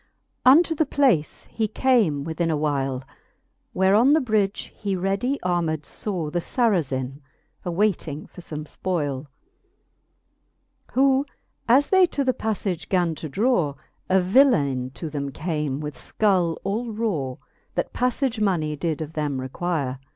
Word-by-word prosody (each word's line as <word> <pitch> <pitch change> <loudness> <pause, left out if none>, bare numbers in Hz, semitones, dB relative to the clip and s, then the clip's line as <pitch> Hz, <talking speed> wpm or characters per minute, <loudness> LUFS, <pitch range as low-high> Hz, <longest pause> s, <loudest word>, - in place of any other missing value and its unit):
XI. - - -45
Unto 325 +5 +6
the 315 -1 0
place 255 - +1
he 225 -1 0
came 210 - +2
within 165 +2 -1
a 155 - +1
while, 135 -3 -1 0.7
Where 190 +1 +3
on 245 +7 +5
the 315 - +5
bridge 215 -6 -1
he 200 -2 -2
ready 195 +9 -1
armed 165 -4 0
faw 175 -8 -4
The 175 - 0
Sarazin, 145 - 0 0.4
awayting 175 -5 -1
for 180 - -12
fome 155 -2 -5
fpol'e. 150 -4 -3 1.7
Who 270 +1 +3 0.4
as 270 +5 +5
they 375 -2 +6
to 285 - -1
the 260 -1 +2
paflage 205 -7 -3
gan 175 -3 +2
to 155 0 -7
draw, 185 - +1 0.3
A 190 +1 +5
villaine 180 - +3
to 165 - -5
them 140 -2 -3
came 150 -2 -2
with 150 -1 -4
fcull 185 -6 +1
all 225 +4 -2
raw, 185 - -2 0.4
That - - -2
paffage 250 -1 0
money 170 -7 +1
did 160 0 -2
of 155 +1 -10
them 145 -4 -2
require. 135 -1 -2
180 Hz, 145 wpm, -24 LUFS, 150-225 Hz, 1.7 s, Unto